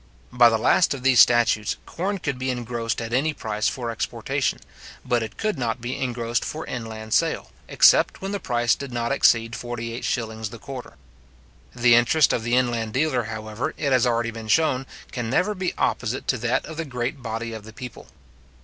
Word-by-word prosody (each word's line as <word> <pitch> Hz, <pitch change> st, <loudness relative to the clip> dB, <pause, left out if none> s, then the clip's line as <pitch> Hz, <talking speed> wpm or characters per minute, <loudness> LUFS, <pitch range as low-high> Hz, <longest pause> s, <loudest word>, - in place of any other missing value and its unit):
By 120 Hz, -1 st, +6 dB
the 115 Hz, -, +1 dB
last 140 Hz, +7 st, +3 dB
of 130 Hz, -, -9 dB
these 130 Hz, -3 st, +5 dB
statutes, 115 Hz, -3 st, +4 dB
corn 195 Hz, +4 st, -3 dB
could 145 Hz, -7 st, -3 dB
be 130 Hz, 0 st, -2 dB
engrossed 120 Hz, -2 st, -2 dB
at 115 Hz, +1 st, -6 dB
any 150 Hz, +4 st, +1 dB
price 110 Hz, -3 st, -2 dB
for 120 Hz, -3 st, -2 dB
exportation; 115 Hz, -, -2 dB, 0.5 s
but 120 Hz, -2 st, +1 dB
it 110 Hz, -1 st, -6 dB
could 215 Hz, -8 st, -1 dB
not 120 Hz, 0 st, -1 dB
be 120 Hz, +2 st, -4 dB
engrossed 120 Hz, -2 st, -1 dB
for 155 Hz, -, -5 dB
inland 110 Hz, -2 st, -6 dB
sale, -, -, +1 dB, 0.2 s
except -, -, +5 dB
when 195 Hz, +1 st, -4 dB
the 200 Hz, -, -2 dB
price 120 Hz, -, +1 dB
did 140 Hz, -2 st, -6 dB
not 120 Hz, +1 st, -2 dB
exceed 115 Hz, -4 st, +3 dB
48s. 115 Hz, -2 st, -4 dB
the 115 Hz, -, -9 dB
quarter. 125 Hz, -, -9 dB, 0.8 s
The 120 Hz, 0 st, +5 dB
interest 120 Hz, +6 st, +4 dB
of -, -, 0 dB
the 120 Hz, +2 st, 0 dB
inland 120 Hz, -3 st, 0 dB
dealer, 130 Hz, -4 st, +1 dB
however, 110 Hz, +1 st, -4 dB
it 140 Hz, -2 st, -1 dB
has 130 Hz, -1 st, +4 dB
already 115 Hz, -1 st, 0 dB
been 110 Hz, -1 st, -8 dB
shown, 135 Hz, 0 st, +2 dB, 0.2 s
can 120 Hz, -3 st, -3 dB
never 185 Hz, -, +1 dB
be 185 Hz, -2 st, -3 dB
opposite 120 Hz, +3 st, -1 dB
to 130 Hz, -, +2 dB
that 120 Hz, +2 st, 0 dB
of 160 Hz, -1 st, -8 dB
the 165 Hz, -, -2 dB
great 130 Hz, +1 st, -3 dB
body 115 Hz, 0 st, -4 dB
of 110 Hz, -1 st, -7 dB
the 110 Hz, -, -11 dB
people. 125 Hz, 0 st, -9 dB
120 Hz, 190 wpm, -24 LUFS, 115-130 Hz, 0.8 s, By